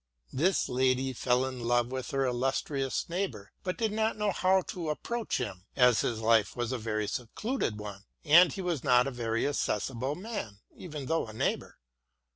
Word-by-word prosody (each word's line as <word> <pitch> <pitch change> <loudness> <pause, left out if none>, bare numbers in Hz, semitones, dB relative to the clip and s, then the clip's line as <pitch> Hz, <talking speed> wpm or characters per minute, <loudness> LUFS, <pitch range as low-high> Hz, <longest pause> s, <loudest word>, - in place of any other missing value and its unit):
This 175 +7 +2
lady 130 +1 +1
fell 125 +1 +1
in 130 -1 -5
love 120 +1 +1
with 130 -1 -4
her 135 -1 0
illustrious 135 +2 -1
neighbour, 185 +3 -3
but 185 -2 -2
did 220 -2 0
not 220 +1 0
know 210 -1 +1
how 190 +1 +3
to 170 -3 -5
approach 235 +9 -2
him, 100 -7 -5
as 125 -5 +5
his 115 -2 -1
life 110 -2 +3
was 120 0 -2
a 130 - -2
very 110 -1 -1
secluded 125 - -2
one, 100 -1 -8 0.2
and 170 +4 +7
he 195 - -5
was 175 -8 -2
not 125 0 +5
a 140 - -2
very 115 0 -1
accessible 130 0 -1
man, 185 - -5 0.2
even 150 -6 -7
though 160 -3 0
a 110 - -9
neighbour. 110 - -2
130 Hz, 180 wpm, -30 LUFS, 120-175 Hz, 0.2 s, and